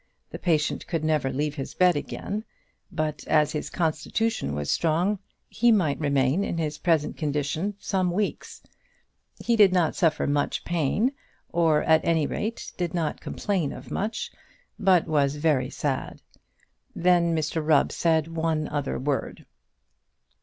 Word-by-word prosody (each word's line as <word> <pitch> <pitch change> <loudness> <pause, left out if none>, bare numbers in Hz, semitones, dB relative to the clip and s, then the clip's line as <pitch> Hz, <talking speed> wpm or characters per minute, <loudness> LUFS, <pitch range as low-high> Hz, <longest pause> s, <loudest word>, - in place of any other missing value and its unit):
The - - -7
patient 155 -4 0
could 165 -3 -2
never 155 -4 +1
leave 150 +2 -1
his 140 -3 -6
bed 180 -1 +4
again; 205 +8 -4 0.5
but 155 -1 -2
as 150 -1 +3
his 150 - -4
constitution 160 - -1
was 75 -1 -2
strong, 175 +5 +1 0.3
he 240 +1 +3
might 175 -10 +2
remain 140 +3 +2
in 170 - -3
his 150 -2 -2
present 160 -4 +1
condition 150 +6 -2
some 190 -3 0
weeks. 200 +4 -3 0.8
He 235 - +1
did 205 -4 +6
not 175 -4 +2
suffer 165 -5 +2
much 145 0 -1
pain, 175 - +1 0.4
or, 160 -3 +2
at 160 0 +4
any 165 -3 +2
rate, 220 +9 -4
did 180 0 -2
not 160 -3 -2
complain 185 -9 -2
of - - -10
much; 215 +2 -3 0.5
but 190 -4 +4
was 145 -3 +1
very 145 -4 +1
sad. 135 -3 -3 0.7
Then 175 -1 +3
Mr 155 0 -1
Rubb 150 -2 +3
said 160 -2 +1
one 160 -2 -1
other 145 -2 -2
word. 140 +1 -3
160 Hz, 145 wpm, -26 LUFS, 150-180 Hz, 0.8 s, did